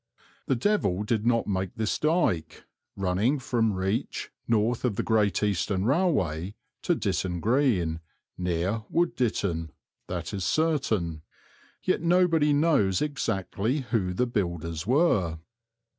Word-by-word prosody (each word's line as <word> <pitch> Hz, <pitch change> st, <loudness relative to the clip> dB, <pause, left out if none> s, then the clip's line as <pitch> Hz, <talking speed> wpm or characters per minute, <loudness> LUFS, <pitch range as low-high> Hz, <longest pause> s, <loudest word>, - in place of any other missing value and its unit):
The 135 Hz, -, +2 dB
devil 115 Hz, -, +1 dB
did 110 Hz, +1 st, -1 dB
not 115 Hz, -1 st, +2 dB
make 95 Hz, -2 st, -2 dB
this 110 Hz, -1 st, -1 dB
dyke, 150 Hz, -, 0 dB, 0.3 s
running 100 Hz, +9 st, +1 dB
from 115 Hz, -5 st, 0 dB
Reach, 95 Hz, +4 st, -2 dB, 0.2 s
north 115 Hz, +1 st, +1 dB
of 120 Hz, -5 st, 0 dB
the -, -, -1 dB
Great 105 Hz, -3 st, +2 dB
Eastern 100 Hz, -1 st, 0 dB
Railway, 105 Hz, -, +1 dB, 0.3 s
to -, -, +1 dB
Ditton 90 Hz, -2 st, -1 dB
Green, 105 Hz, -, +1 dB, 0.4 s
near 90 Hz, +4 st, -1 dB
Wood 175 Hz, 0 st, +1 dB
Ditton, 90 Hz, -9 st, -1 dB, 0.4 s
that 90 Hz, +1 st, -4 dB
is 95 Hz, -2 st, -3 dB
certain; 110 Hz, -, 0 dB, 0.6 s
yet -, -, +1 dB
nobody 165 Hz, -3 st, +3 dB
knows 145 Hz, -, +3 dB
exactly 125 Hz, -2 st, -1 dB
who 100 Hz, -7 st, +1 dB
the 125 Hz, -, +2 dB
builders 85 Hz, -7 st, -3 dB
were. 115 Hz, -, +2 dB
105 Hz, 125 wpm, -27 LUFS, 90-135 Hz, 0.6 s, nobody